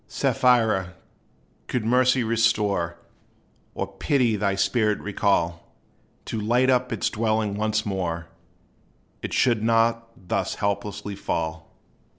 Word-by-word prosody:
Sapphira, 110 -7 +2 0.7
could 125 -4 -2
Mercy 125 +1 +3
restore, 105 -6 +1 0.8
Or - - -2
Pity 125 -6 +1
thy 100 -1 0
spirit 105 +1 +1
recall, 85 -5 -1 0.5
To 110 - -3
light 125 +4 +3
up 125 0 +1
its 115 - -1
dwelling 110 -1 0
once 110 +1 -1
more, 90 -4 -2 1.0
It - - -5
should 120 -4 +2
not 115 +1 +2
thus 90 - -2
hopelessly 100 0 -3
fall. 80 -4 -4
105 Hz, 110 wpm, -24 LUFS, 100-115 Hz, 1.0 s, Mercy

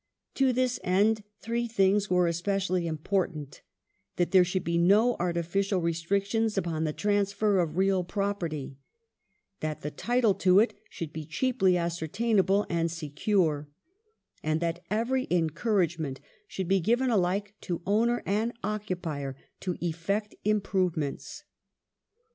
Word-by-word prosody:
To 270 -1 +3
this 250 0 0
end 210 +4 +2 0.2
three 235 +1 -1
things 200 -2 +2
are 180 -1 +3
especially 180 +1 0
important; 155 -2 -2 0.5
that 175 - 0
there 190 -2 +7
should 180 +1 -2
be 170 - -1
no 210 +8 +4
artificial 180 +3 0
restrictions 200 +6 0
upon 165 -4 -1
the 155 - 0
transfer 205 +1 +1
of 165 -2 -1
real 190 -1 +2
property; 175 -8 -3 0.8
that 155 -1 -3
the 150 - -4
title 240 0 +2
to 185 0 +3
it 225 - +3 0.2
should 155 -3 -6
be 160 - -5
cheaply 185 - +1
ascertainable 190 +4 +1
and 170 -1 0
secure, 155 -1 0 0.7
and 155 +1 0
that 170 +1 -2
every 240 +5 0
encour 180 +4 +2
agement 155 -5 -5 0.3
should 190 - -4
be 195 +1 +3
given 240 +7 +2
alike 200 0 0
to 175 -2 -4
owner 230 +4 +2
and 220 +4 0
occupier 180 -10 -3 0.2
to 180 -2 -3
effect 175 +6 -2
im 210 0 +2
provements. 175 -8 -2
185 Hz, 130 wpm, -28 LUFS, 170-210 Hz, 0.8 s, there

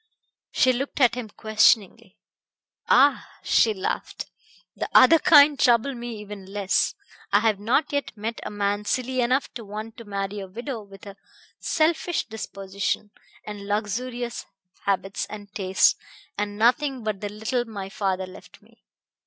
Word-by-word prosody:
She 255 - +3
looked 275 +4 -4
at 245 -4 +5
him 245 -3 -5
questioningly. 215 -1 +2 0.7
"Ah!" 280 +3 +4 0.2
she 225 - +4
laughed. 190 -3 -4 0.5
"The - - -4
other 315 +6 +8
kind 295 -4 +6
trouble 240 +3 +3
me 240 -2 -6
even 205 -2 -9
less. 200 -1 0 0.4
I 205 +1 +4
have 215 -3 +1
not 280 +8 +1
yet 285 -6 -2
met 220 +2 -4
a - - -5
man 205 0 -1
silly 255 +3 -1
enough 255 +3 0
to 235 - -7
want 215 +3 -8
to 230 - -10
marry 200 0 -4
a 195 - -7
widow 235 +5 -6
with 195 -1 -14
a 200 -1 -10 0.4
selfish 330 +1 0
disposition, 200 -1 -4 0.3
and 205 -1 -8
luxurious 235 +4 -3 0.4
habits 195 0 -1
and 205 -1 -10
tastes, 190 -2 +3 0.4
and 205 0 -3
nothing 255 +3 +2
but 215 -3 -3
the 205 - -3
little 220 +4 -2
my 205 -4 -7
father 195 -2 -2
left 185 0 -14
me." - - -26
215 Hz, 150 wpm, -24 LUFS, 200-250 Hz, 0.7 s, other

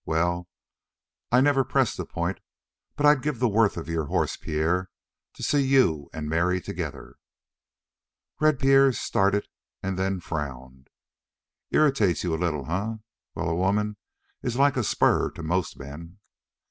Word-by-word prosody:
Well, 85 +2 0 0.8
I 125 +1 +5
never 135 -1 +3
press - - +1
the - - -5
point, - - -3 0.6
but 145 - 0
I'd 145 -2 +6
give 150 -2 -2
the 125 +1 +2
worth 110 -2 +2
of 85 - -5
your 80 -2 -1
horse, - - 0
Pierre, 85 +4 -1 0.5
to - - -9
see 145 - +2
you 130 - +2
and 80 -1 -5
Mary 85 +4 +1
together." - - -6 1.2
Red 155 -2 +3
Pierre 135 0 +5
started, 100 -2 +1 0.4
and 95 -1 -2
then 95 0 0
frowned. 65 -5 -6 0.8
"Irritates 135 - +2
you 85 -2 -1
a 80 - -2
little, 75 -5 -1
eh? 100 +8 -2 0.4
Well, 85 - -2
a 80 - 0
woman 105 +4 0 0.5
is 125 -1 -2
like 140 0 +4
a 120 - 0
spur - - +2
to 85 - -7
most 85 +2 -1
men." 80 +6 -10
95 Hz, 150 wpm, -26 LUFS, 80-125 Hz, 1.2 s, I'd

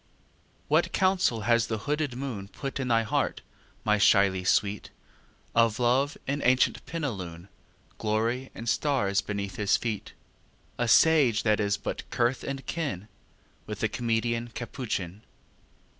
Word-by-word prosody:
XII - - -37 0.6
What - - +2
counsel 185 - +2
has 115 +1 +2
the 110 - -2
hooded 145 +3 -2
moon 125 -7 -5
Put 135 +6 -6
in 130 - -2
thy 115 -2 +3
heart, 105 - -1 0.4
my 105 -1 +2
shyly 100 -2 +4
sweet, 100 +2 +1 0.6
Of 115 -1 +3
Love 130 +4 +2
in 140 +1 -2
ancient 130 +1 +2
plenilune, 95 - -5 0.5
Glory 115 +4 -1
and 115 - -7
stars 120 -7 +1
beneath 100 -1 -4
his 100 -2 +3
feetâ 110 -4 -4 0.7
A 120 - +1
sage 140 -4 +5
that 110 -1 +2
is 100 -1 +1
but - - -5
kith 120 +2 0
and 135 -1 -5
kin 135 - -4 0.6
With 105 -1 -6
the 110 - +3
comedian 115 0 -1
Capuchin? 110 -6 -5
115 Hz, 140 wpm, -28 LUFS, 105-130 Hz, 0.7 s, sage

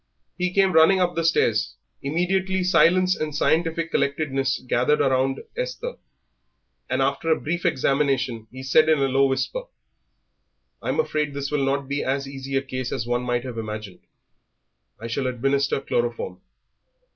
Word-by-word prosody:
He 180 0 -1
came 195 0 +3
running 160 +4 +6
up 175 -1 +1
the 165 - -1
stairs; 115 -9 +2 0.3
immediately 185 +5 0
silence 185 0 +4
and 155 -1 -4
scientific 165 +2 +1
collectedness 135 -2 0
gathered 125 +5 +2
round 135 0 +1
Esther, - - -4 1.0
and 130 +1 +1
after 140 +4 -1
a 160 - +3
brief 175 +4 -1
examination 135 -6 0
he 130 +1 -9
said, 155 +4 +4
in 155 - +5
a 135 -1 +2
low 135 +1 +3
whisper - - -2 1.2
"I'm - - -2
afraid 150 - -1
this 140 0 -3
will 145 -2 +1
not 135 0 0
be 140 +1 -2
as 135 +1 -1
easy 135 0 -6
a 135 - +1
case 130 -2 -4
as 115 - -2
one 120 0 0
might 125 -1 -1
have 125 -3 -5
imagined. 105 -3 -6 1.0
I 115 - -8
shall 120 +3 -2
administer 135 +3 0
chloroform." 120 -8 -2
140 Hz, 155 wpm, -24 LUFS, 130-165 Hz, 1.2 s, running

